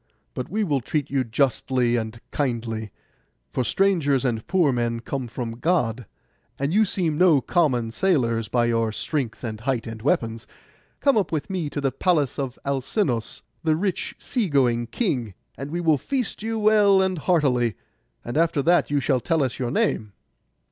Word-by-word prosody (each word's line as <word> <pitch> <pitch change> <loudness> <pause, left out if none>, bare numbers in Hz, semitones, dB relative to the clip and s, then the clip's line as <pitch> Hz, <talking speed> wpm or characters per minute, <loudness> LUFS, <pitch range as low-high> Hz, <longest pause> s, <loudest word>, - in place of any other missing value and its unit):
But 125 - -5
we 215 +3 0
will 145 -8 0
treat 145 +3 -2
you 135 -2 +1
justly 125 0 +1
and 115 0 -3
kindly, 115 -6 -2 0.6
for 130 - 0
strangers 145 - +2
and 115 -3 -1
poor 170 -8 +3
men 120 -1 -1
come 130 0 -4
from 115 -1 -5
God; 125 - 0 0.5
and 140 +4 -1
you 215 +2 +5
seem 170 -6 0
no 175 -6 +6
common 130 -8 +1
sailors 115 - +1
by 120 +1 +1
your 115 -1 +1
strength, 130 +1 -3
and 110 -3 -4
height, 125 0 -1
and 115 -1 -7
weapons. 115 -3 -1 0.5
Come 280 -4 +4
up 205 - +1
with 155 +2 -2
me 175 -6 -2
to 145 - -4
the 135 -2 0
palace 150 -2 +1
of 135 -2 -3
Alcinous, 135 - -1 0.2
the 160 -1 +3
rich 185 +2 -2
sea 235 -8 -1
going 120 -5 +2
king, 120 - -2 0.2
and 135 +1 -6
we 170 +3 -3
will 160 -4 +3
feast 260 - -3
you 225 +1 -2
well 210 -2 +5
and 190 -2 +1
heartily; 130 - +2 0.5
and 120 +5 -3
after 160 -3 +2
that 175 +3 +3
you 145 0 +2
shall 135 -1 +1
tell 160 +3 +1
us 130 - -3
your 125 -2 -1
name. 105 -3 0
135 Hz, 175 wpm, -24 LUFS, 120-170 Hz, 0.6 s, no